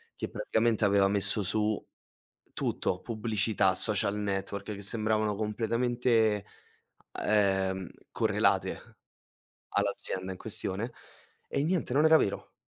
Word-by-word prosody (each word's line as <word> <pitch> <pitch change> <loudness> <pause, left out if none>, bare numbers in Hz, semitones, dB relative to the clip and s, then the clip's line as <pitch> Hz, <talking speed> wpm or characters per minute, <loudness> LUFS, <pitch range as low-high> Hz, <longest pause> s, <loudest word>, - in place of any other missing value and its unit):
che - - -4
praticamente 115 - 0
aveva 100 -1 +4
messo 100 +1 +2
su 105 +2 +1 0.8
tutto, 90 - -1
pubblicità, 110 -4 +1
social 100 0 +1
network, 100 -1 -3
che 100 - -7
sembravano 110 0 0
completamente, 115 0 +1 0.8
ehm, 95 -3 +1 0.2
correlate - - +1 0.9
all'azienda 95 0 -2
in 95 - -7
questione 110 +2 0 0.5
e 140 - -1
niente, 170 -5 -1
non 150 +3 +4
era 160 0 +7
vero. 100 - -2
105 Hz, 105 wpm, -29 LUFS, 100-115 Hz, 0.9 s, era